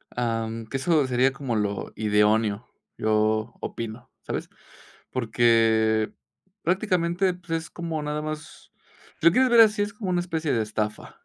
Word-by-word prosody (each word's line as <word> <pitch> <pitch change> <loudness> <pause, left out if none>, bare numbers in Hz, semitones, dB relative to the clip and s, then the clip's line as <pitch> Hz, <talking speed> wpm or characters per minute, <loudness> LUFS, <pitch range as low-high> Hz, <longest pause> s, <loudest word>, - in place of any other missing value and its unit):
Am, 115 -1 -2
que 135 - -4
eso 150 0 +2
sería 130 +1 +3
como 135 -4 -3
lo 100 -2 -2
idóneo, 105 +1 +2 0.3
yo 110 +1 +1
opino, 115 +3 -6
¿sabes?, - - -4 0.6
porque, 110 -2 +2 0.5
prácticamente, 180 0 +1
pues, 175 -1 -14
es 165 -1 -2
como 165 -3 -4
nada 150 +1 -2
más 155 0 -7 0.5
si - - -4
lo - - +8
quieres 255 +7 +3
ver 235 -1 +7
así, 210 -2 +4
es 205 0 -2
como 200 -3 -4
una 180 - +1
especie 160 -4 -2
de 115 - +1
estafa. 105 0 -4
125 Hz, 150 wpm, -25 LUFS, 110-170 Hz, 0.6 s, lo